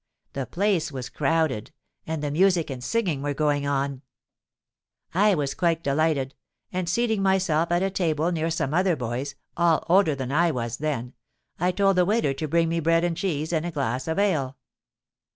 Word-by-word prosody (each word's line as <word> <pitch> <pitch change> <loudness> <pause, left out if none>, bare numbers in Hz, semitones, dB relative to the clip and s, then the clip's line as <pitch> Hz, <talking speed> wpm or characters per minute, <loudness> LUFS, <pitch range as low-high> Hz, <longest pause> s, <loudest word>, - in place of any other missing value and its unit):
The 135 -2 -3
place 185 -5 0
was 130 -3 -6
crowded; 150 -7 0 0.4
and 160 -2 -3
the 145 - -1
music 175 -1 +2
and 125 -2 -6
singing 180 - 0
were 145 0 -2
going 145 -1 +1
on. 140 -1 -1 1.1
I 200 +3 +4
was 145 -4 -1
quite 170 -2 0
delighted, 140 -1 +1 0.4
and, 180 -2 -2
seating 220 +1 +1
myself 180 -4 +2
at 175 +2 +2
a 195 - 0
table 165 -2 0
near 165 -1 -1
some 155 -4 -1
other 180 0 +3
boys, 130 +2 -4 0.2
all 170 -2 +3
older 175 -3 +4
than 130 -1 -4
I 170 +4 +3
was 120 -5 -3
then, 135 -5 -3 0.5
I 180 +2 +2
told 195 0 +2
the 180 - +5
waiter 205 -8 +1
to 155 +3 -4
bring 165 +2 +2
me 165 +1 0
bread 165 +1 +2
and 175 -1 0
cheese 160 -3 -2
and 160 -1 +1
a 175 - -2
glass 130 -5 -2
of 160 - -1
ale. 155 -10 +1
160 Hz, 185 wpm, -25 LUFS, 140-175 Hz, 1.1 s, the